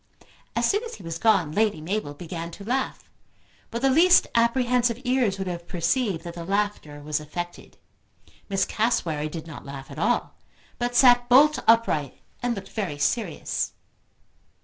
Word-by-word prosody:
As - - +2
soon 410 +3 +1
as 465 - -7
he 195 - -13
was 165 0 -5
gone 180 -8 +3
Lady 210 +1 +1
Mabel 160 -2 -3
began 170 +1 -6
to 200 - -10
laugh, 260 +5 -2 0.6
but 235 +2 -5
the 270 - +5
least 350 +6 +6
apprehensive 235 0 +2
ears 245 -6 +1
would 190 - -3
have 175 -1 -5
perceived 180 +1 0
that 170 -1 -7
the 170 - -7
laughter 195 -6 -2
was 150 0 -1
affected. 175 +3 -7 0.7
Miss 195 -1 +1
Cassewary 165 -10 0
did 160 0 -7
not 160 -3 -9
laugh 140 0 -9
at 140 - -8
all, 240 +7 0 0.5
but 245 0 -2
sat 245 -1 +6
bolt 280 +3 +6
upright 225 - +3 0.2
and 245 -1 0
looked 195 -1 -8
very 190 -9 -3
serious. 180 +2 -1
200 Hz, 160 wpm, -25 LUFS, 165-245 Hz, 0.7 s, least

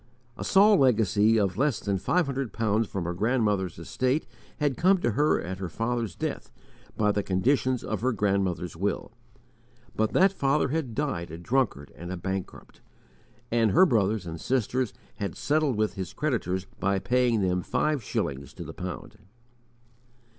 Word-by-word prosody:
A - - -6
small 205 +1 +5
legacy 110 - +4
of 95 -2 0
less 140 -5 +2
than 100 -2 -1
five 175 - +1
hundred 135 -3 -3
pounds 110 0 +1
from 95 -2 -4
her 85 +1 -2
grandmother's 105 -3 0
estate 130 - -1 0.3
had 145 -3 0
come 190 +3 +4
to 120 -9 0
her 150 +8 +2
at 95 +2 -5
her 95 -2 -4
father's 115 -1 -2
death - - -4 0.5
by 105 -1 +3
the 105 - 0
conditions 125 +6 +1
of 110 - -3
her 130 +2 +2
grandmother's 95 -5 0
will. 100 +5 -2 0.8
But 110 0 0
that 190 +1 +5
father 140 -4 +1
had 140 -6 -2
died 110 - -2
a 80 - -7
drunkard 85 - -1
and 85 +1 -7
a 95 - -4
bankrupt, 95 +1 -6 0.7
and 115 -2 +3
her 185 +3 +7
brothers 110 - +1
and 80 -1 -6
sisters 130 -1 0 0.3
had 100 -4 -4
settled 150 -3 +1
with 110 -1 0
his 95 -3 -6
creditors 95 - -1
by 100 +2 +1
paying 120 +1 +2
them 90 -1 +1
five 150 - 0
shillings 70 -7 -3
to - - -7
the - - -8
pound. 90 +3 -7
110 Hz, 165 wpm, -27 LUFS, 95-130 Hz, 0.8 s, her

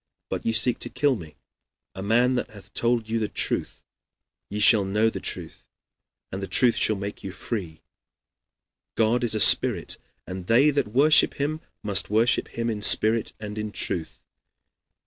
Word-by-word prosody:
But - - -4
ye - - +2
seek 115 +2 0
to 120 - -4
kill 145 0 +1
me, 80 -7 -11 0.6
a 95 - -8
man 120 +5 +2
that 125 - -2
hath 100 -2 -15
told 115 -1 0
you 115 +1 -1
the 110 - -1
truth. - - -3 0.7
Ye 105 - -4
shall 105 0 +5
know 105 +4 +1
the - - -6
truth, - - -6 0.6
and 95 - -5
the 95 - -5
truth 125 -3 +3
shall 110 - +1
make 100 +1 -7
you 95 - -6
free. 90 -4 -6 1.1
God 115 +2 +1
is 115 -2 +1
a - - -1
spirit, - - +3 0.3
and 90 -1 -8
they 135 +6 +4
that 140 -6 -1
worship 140 +8 +4
him 155 +2 -3 0.2
must 100 -2 +1
worship 110 +3 +2
him 115 0 -4
in 110 -3 -3
spirit 110 +2 +3
and 105 0 -7
in 105 0 -4
truth. 80 -5 -3
110 Hz, 170 wpm, -24 LUFS, 100-120 Hz, 1.1 s, shall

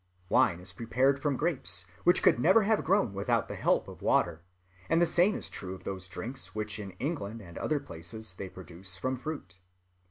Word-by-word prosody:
Wine 85 - +4
is 90 - -8
prepared 130 +4 +2
from 145 -3 +1
grapes, 100 - -1 0.2
which 175 +1 +5
could - - +5
never 190 - +6
have 215 +1 +2
grown 190 - +3
without 100 0 +1
the - - -5
help - - +2
of - - -10
water; 85 -2 +2 0.5
and 165 - +4
the 175 - +6
same 175 +5 +3
is - - -3
true 95 0 -6
of 90 - -13
those 95 -2 -5
drinks 120 +8 -6
which 105 0 -2
in 100 -2 -5
England 125 -7 -3
and 85 -5 -11
other 155 -1 +1
places 90 +2 -8
they 95 +1 -6
produce 90 0 -7
from 130 +5 -1
fruit.... 125 -10 -6
110 Hz, 195 wpm, -30 LUFS, 95-150 Hz, 0.5 s, never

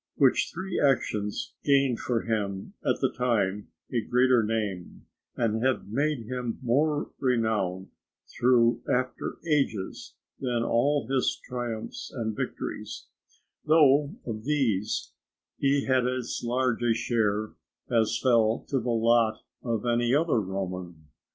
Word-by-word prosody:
Which 135 -3 +3
three 185 +2 -3
actions 110 -7 0
gained 135 -4 +3
for 120 -3 -1
him 100 -4 -2
at - - +1
the - - +1
time 105 -5 0 0.3
a 120 - +2
greater 125 +2 +3
name, 105 -5 -3 0.3
and 110 -1 0
have 130 -6 0
made 140 +1 0
him 125 -1 -3
more 145 +5 +1
renowned 110 -7 0 0.4
through 120 -1 +3
after 130 +1 -1
ages 135 - -1 0.2
than 120 -3 -1
all 140 +3 +2
his 135 0 0
triumphs 120 -3 -5
and 110 -3 -3
victories, - - -5 0.5
though 150 -2 +4
of 110 -2 -5
these 120 -8 0 0.5
he 140 0 +2
had 130 -2 +2
as 125 -1 -3
large 125 0 0
a 120 -1 +2
share 110 -2 0 0.4
as 115 -2 +2
fell 115 -3 +2
to 135 - +1
the 120 +1 -3
lot 115 -1 +2 0.2
of 115 -2 -2
any 120 +1 +2
other 155 -5 +2
Roman. 90 -5 -5
120 Hz, 125 wpm, -27 LUFS, 110-130 Hz, 0.5 s, though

